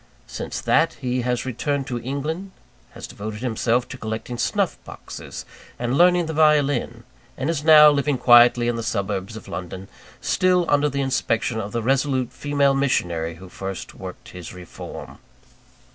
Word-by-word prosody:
Since - - -6
that, - - +2
he 125 0 -2
has 125 +1 -1
returned 135 +3 -2
to 120 -2 -4
England; 150 +9 -4 0.4
has - - -8
devoted 105 +1 -7
himself 120 0 0
to 130 - -8
collecting 110 +2 -5
snuff - - 0
boxes - - -9 0.3
and 120 +2 -1
learning 175 +1 +4
the 160 - -4
violin; 145 -6 +2 0.3
and 135 +5 -1
is 150 -3 -3
now 150 -1 +8
living 145 -1 0
quietly 120 0 +6
in 120 -1 0
the - - -3
suburbs 100 -2 -3
of - - -12
London, 95 +1 -7 0.3
still 180 -1 +2
under 145 0 +3
the 140 0 -2
inspection 120 -3 0
of 105 -1 -5
the 115 0 -2
resolute 130 0 0
female 145 -1 +1
missionary 85 -12 0
who 95 +3 -12
first 95 0 -7
worked - - -10
his 90 0 -9
reform. 90 -2 -10
125 Hz, 160 wpm, -22 LUFS, 110-145 Hz, 0.4 s, now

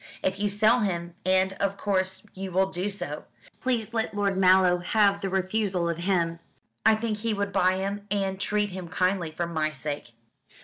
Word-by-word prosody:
If 190 +1 0
you 205 0 +1
sell 215 +4 +4
him 175 -5 -2
and, 190 0 +3
of 200 0 0
course, 190 -1 -1
you 190 0 -6
will 190 +2 +2
do 185 +2 -2
so 175 -7 -5 0.3
please 235 -3 -1
let 220 -2 -1
Lord 200 -1 +1
Mallow 185 -1 +5
have 200 +2 +2
the 195 - -2
refusal 190 -1 0
of 170 -1 -1
him. 170 -2 0 0.4
I 220 - +6
think 215 -1 -2
he 225 0 -1
would 200 -1 -2
buy 185 -1 +3
him 200 +2 -3
and 195 -1 -1
treat 210 0 0
him 180 -1 -6
kindly, 185 -1 0
for 165 +2 -3
my 160 -2 -1
sake." 145 -3 -6
190 Hz, 185 wpm, -27 LUFS, 180-205 Hz, 0.4 s, I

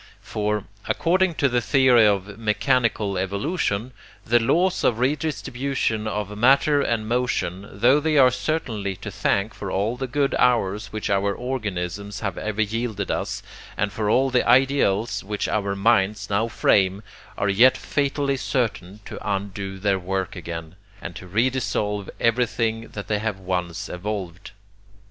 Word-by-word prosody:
For, 105 -1 -2 0.2
according 185 0 +2
to 140 - +2
the 120 -2 +1
theory 125 -1 +5
of 100 -1 0
mechanical 110 -3 +1
evolution, 100 - -1 0.3
the 120 +2 +4
laws 175 +11 +1
of 115 - +2
redistribution 130 -4 -1
of 105 -1 -3
matter 140 +6 +4
and 115 -5 -1
motion, 105 -6 -1
tho 120 +8 +4
they 155 0 +1
are 130 -2 +7
certainly 110 -10 -2
to 100 +2 -7
thank 100 +3 0
for 100 - -6
all 100 +5 0
the 130 +1 -3
good 140 +2 0
hours 105 -4 +2
which 110 -1 -3
our 100 0 +1
organisms 100 -5 -4
have 100 -5 -2
ever 110 0 0
yielded 110 -2 -3
us - - -3 0.3
and 105 -1 -1
for 105 0 -1
all 130 +4 +3
the 125 -1 +2
ideals 120 -4 +3
which 105 +1 -3
our 100 -2 -1
minds 105 -1 +1
now 105 +3 +2
frame, 100 -3 +2 0.3
are 100 - 0
yet 120 +6 +5
fatally 140 -1 -1
certain 105 -7 -2
to - - -7
undo 100 -1 -3
their 95 0 +1
work 95 +1 -3
again, 85 -2 -6 0.3
and - - -7
to 95 - -9
redissolve 105 -2 -1
everything 115 -1 0
that 100 -2 -8
they 105 -1 0
have 110 -2 -2
once 90 -3 -3
evolved. 95 -1 -5
105 Hz, 150 wpm, -23 LUFS, 100-125 Hz, 0.3 s, are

